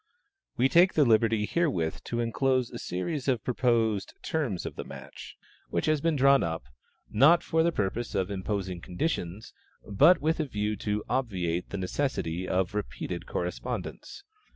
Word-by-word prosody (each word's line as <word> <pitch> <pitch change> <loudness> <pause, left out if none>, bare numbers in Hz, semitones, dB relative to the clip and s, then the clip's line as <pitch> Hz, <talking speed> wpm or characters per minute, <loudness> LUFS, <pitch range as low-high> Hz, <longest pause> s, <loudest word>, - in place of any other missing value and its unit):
We 125 +2 +4
take 175 +6 +5
the 150 - +5
liberty 110 -2 +3
herewith 130 - -1
to 120 0 -2
inclose 130 +1 +1
a 120 - -7
series 140 - -3
of 125 -5 +1
proposed 115 -5 +1
"terms 130 - -2
of - - -5
the - - -5
match," - - -10 0.3
which - - -1
has 155 -2 +2
been 165 0 +1
drawn 140 0 +5
up, 80 -5 -2 0.5
not 160 +9 +5
for 160 0 +1
the 170 +1 +3
purpose 110 -1 -2
of 95 0 0
imposing 95 -2 -3
conditions, 90 - -3 0.3
but 165 - +5
with 160 +3 0
a 155 - +1
view 105 -4 -2
to 105 +1 -2
obviate 90 -9 -1
the 100 - -4
necessity 95 - -2
of 95 +2 0
repeated 105 0 -4
correspondence. 400 - -5
115 Hz, 155 wpm, -28 LUFS, 95-140 Hz, 0.5 s, take